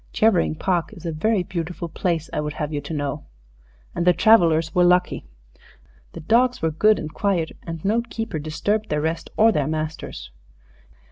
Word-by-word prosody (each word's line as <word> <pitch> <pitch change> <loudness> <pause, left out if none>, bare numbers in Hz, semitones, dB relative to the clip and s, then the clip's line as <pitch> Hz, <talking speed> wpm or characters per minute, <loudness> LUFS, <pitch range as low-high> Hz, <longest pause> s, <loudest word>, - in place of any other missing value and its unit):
Chevering 210 -9 +2
Park 180 +3 -1
is 180 -5 -12
a 165 - -1
very 185 +5 +1
beautiful 170 -1 -5
place, 165 -1 -2
I - - -1
would 150 0 -4
have 155 0 -4
you 145 - -2
to 145 +3 -7
know. 145 0 -4 0.7
And - - -1
the 180 - +7
travellers 165 -7 +4
were 180 - +4
lucky. 180 0 +2 0.9
The - - -8
dogs 245 +8 +2
were 160 - 0
good 215 +7 +3
and 155 0 -6
quiet, 185 -6 0 0.2
and 165 0 -6
no 220 +4 +2
keeper 225 -7 -5
disturbed 205 +8 -2
their 150 - 0
rest 165 +2 -2
or 225 +1 +6
their 150 -8 0
masters. 155 - -5
165 Hz, 180 wpm, -23 LUFS, 155-205 Hz, 0.9 s, the